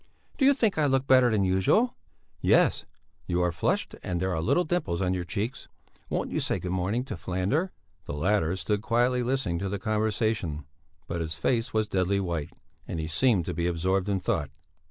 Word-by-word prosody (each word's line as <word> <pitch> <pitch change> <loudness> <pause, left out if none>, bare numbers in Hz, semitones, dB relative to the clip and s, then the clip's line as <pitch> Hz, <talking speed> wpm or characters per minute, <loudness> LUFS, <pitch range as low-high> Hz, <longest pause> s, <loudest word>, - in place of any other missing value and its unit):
"Do 270 - +4
you 280 +1 +6
think 220 - +1
I 150 - +3
look 135 -1 +2
better 130 -2 +6
than 105 -3 +2
usual?" 95 - +2 0.4
"Yes! - - +3 0.4
You 90 0 +1
are 90 - +2
flushed - - -1
and 90 -1 -2
there 95 -1 0
are 80 - -1
little 175 - +2
dimples 155 - -1
in 95 -1 +1
your 90 -1 -2
cheeks! 110 +8 -4 0.4
Won't - - -2
you - - 0
say - - 0
good 90 - -4
morning 95 +7 0
to - - -5
Falander?" 95 - -1 0.4
The - - -5
latter 85 +1 +1
stood 105 +2 -1
quietly 120 +3 +2
listening 120 -9 -1
to 100 +1 -2
the 100 - -2
conversation, 110 - -1 0.4
but 85 - -3
his 80 -1 -3
face 115 +8 0
was 110 -1 +1
deadly 95 +1 +1
white 85 -6 -2 0.4
and 80 - -4
he 80 - -2
seemed 90 +2 +2
to 90 - -3
be 85 +1 -1
absorbed 90 +3 0
in 100 -1 +1
thought. 75 -5 -1
95 Hz, 195 wpm, -27 LUFS, 85-120 Hz, 0.4 s, you